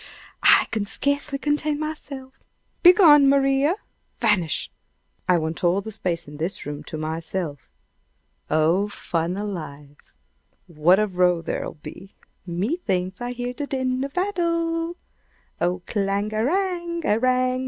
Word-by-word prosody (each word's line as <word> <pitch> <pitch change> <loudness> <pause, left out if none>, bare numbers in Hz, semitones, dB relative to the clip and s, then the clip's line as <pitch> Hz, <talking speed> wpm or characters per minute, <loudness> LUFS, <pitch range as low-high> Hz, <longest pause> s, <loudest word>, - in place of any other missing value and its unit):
I - - +6
can 210 -2 -1
scarcely 285 +4 -1
contain 295 +1 0
myself! 280 -4 -6 0.4
Begone, 325 -6 +8
Maria! 275 +3 +3 0.4
Vanish! 200 -9 +1 0.6
I 180 - +5
want 160 +1 -3
all 175 +2 +3
the 220 +2 -7
space 175 -6 -3
in 145 0 -10
this 165 +6 -3
room 145 +1 -6
to 155 - -6
myself! 160 -1 -4 0.8
Oh, 165 +6 +2
fun 170 -2 -2
alive! 150 -8 -7 0.5
What 170 +3 +3
a 215 - +3
row 180 -3 +1
there'll - - -4
be! 185 +5 -11 0.3
Me 190 - -1
thinks 185 - -2
I 245 0 -3
hear 245 0 -4
the 285 +3 -5
din 260 -1 -1
of 275 0 -6
battle! 335 -2 -1 0.6
"Oh 180 +1 0
clanga 205 +1 -1
a - - +1
rang! 345 0 -1
a 215 -4 +2
rang! 255 0 +2
215 Hz, 135 wpm, -23 LUFS, 175-285 Hz, 0.8 s, Begone